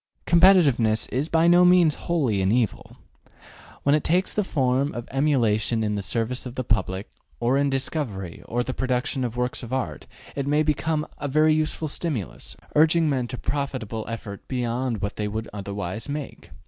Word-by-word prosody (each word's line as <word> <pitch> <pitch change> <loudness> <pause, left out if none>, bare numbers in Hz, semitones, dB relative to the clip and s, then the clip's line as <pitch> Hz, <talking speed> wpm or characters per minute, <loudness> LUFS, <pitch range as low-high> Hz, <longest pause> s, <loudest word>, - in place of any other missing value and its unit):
Competitiveness 155 - +4
is 140 +6 -2
by 165 +1 +3
no 175 +1 +6
means 180 -3 +5 0.2
wholly 130 - +1
an 95 +1 +2
evil. 115 -2 -1 0.9
When 140 - +3
it 150 - +2
takes 180 +3 +1
the 210 - +1
form 135 -4 0
of 120 0 -6
emulation 120 -5 +1
in 105 -1 0
the 100 - -2
service 120 +5 -2
of 125 - -9
the 130 - -2
public, 95 -3 -1 0.3
or 120 +2 +2
in 140 0 +2
discovery 130 - -3
or 120 +1 -1
the 130 - -4
production 130 +1 -1
of 120 -1 -3
works 125 0 -1
of 120 - -8
art, 120 - -3 0.3
it 140 -1 -2
may 150 +2 +3
become 155 +1 0
a 145 - -3
very 155 +3 +4
useful 155 0 -1
stimulus, 95 - -3 0.2
urging 160 +1 +4
men 130 -3 -1
to 125 - -5
profitable 125 -5 -3
effort 110 -3 -7
beyond 120 -3 -2
what 100 - -3
they 105 - -1
would 110 +2 -4
otherwise 100 +3 -5
make. 145 -1 -6
130 Hz, 175 wpm, -24 LUFS, 110-150 Hz, 0.9 s, no